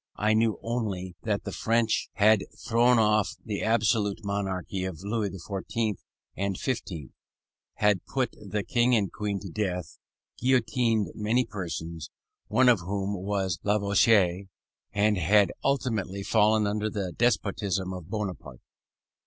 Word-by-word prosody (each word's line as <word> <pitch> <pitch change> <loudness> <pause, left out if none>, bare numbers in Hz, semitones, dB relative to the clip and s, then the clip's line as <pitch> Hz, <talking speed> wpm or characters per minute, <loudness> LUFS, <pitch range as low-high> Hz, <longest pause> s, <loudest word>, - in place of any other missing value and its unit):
I 105 +1 +2
knew 110 0 +2
only 100 -7 -3
that 105 -2 -1
the - - -5
French 115 -1 +1
had 105 -1 +4 0.2
thrown 120 +1 +4
off 105 -2 +2
the 105 -2 -3
absolute 110 -2 +1
monarchy 95 -2 -2
of 95 -2 -5
Louis 105 0 -1
XIV. 100 +3 -3 0.4
and 100 -1 -2
XV., 90 - -4 0.6
had 105 -4 +2
put 130 -3 -1
the 105 0 -3
King 120 +1 +2
and 100 -4 +1
Queen 105 -2 -2
to 100 - -7
death, 90 -3 -3 0.4
guillotined 120 -5 +2
many 115 +4 +1
persons, 85 -5 -5 0.4
one 120 +5 +3
of 120 -5 +6
whom 95 +3 -2
was 95 -2 -2
Lavoisier, 100 -2 +3 0.5
and 105 -1 +2
had 100 +3 +4
ultimately 110 -8 -1
fallen 105 +1 +3
under 105 +1 -1
the 100 -4 -3
despotism 100 -4 0
of 90 -2 -8
Bonaparte. 95 - -5
105 Hz, 130 wpm, -27 LUFS, 95-110 Hz, 0.6 s, of